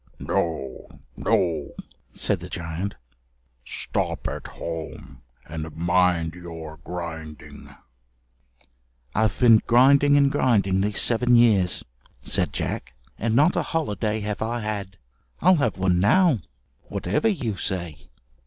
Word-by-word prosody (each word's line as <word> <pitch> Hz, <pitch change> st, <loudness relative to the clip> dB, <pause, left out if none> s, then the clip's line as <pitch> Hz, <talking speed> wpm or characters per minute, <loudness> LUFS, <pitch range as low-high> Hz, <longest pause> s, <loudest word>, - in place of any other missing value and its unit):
"No, 75 Hz, -6 st, -3 dB, 0.3 s
no," 80 Hz, -3 st, 0 dB, 0.4 s
said -, -, 0 dB
the -, -, -9 dB
giant, 85 Hz, +4 st, -4 dB, 0.7 s
"stop -, -, -2 dB
at -, -, -5 dB
home 80 Hz, -6 st, -7 dB, 0.2 s
and 80 Hz, 0 st, -7 dB
mind 85 Hz, -1 st, +2 dB
your 80 Hz, -3 st, -9 dB
grinding." 80 Hz, -1 st, -8 dB, 1.4 s
"I've 110 Hz, -2 st, +1 dB
been 115 Hz, -3 st, +6 dB
grinding 140 Hz, +4 st, +5 dB
and 140 Hz, -1 st, +4 dB
grinding 100 Hz, -8 st, +2 dB
these 105 Hz, 0 st, 0 dB
seven 120 Hz, +1 st, +3 dB
years," 105 Hz, -7 st, +4 dB, 0.4 s
said -, -, 0 dB
Jack, 65 Hz, 0 st, -4 dB, 0.2 s
"and 110 Hz, +1 st, 0 dB
not 150 Hz, +7 st, +4 dB
a 175 Hz, -, +2 dB
holiday 110 Hz, -9 st, -2 dB
have 105 Hz, 0 st, -4 dB
I 115 Hz, +2 st, -2 dB
had. 100 Hz, -3 st, -4 dB, 0.4 s
I'll 185 Hz, +1 st, +5 dB
have 115 Hz, -9 st, 0 dB
one 90 Hz, -1 st, +2 dB
now, 155 Hz, -, +4 dB, 0.5 s
whatever 100 Hz, -, -1 dB
you 135 Hz, -, -1 dB
say." 85 Hz, -8 st, -4 dB
100 Hz, 115 wpm, -24 LUFS, 85-120 Hz, 1.4 s, been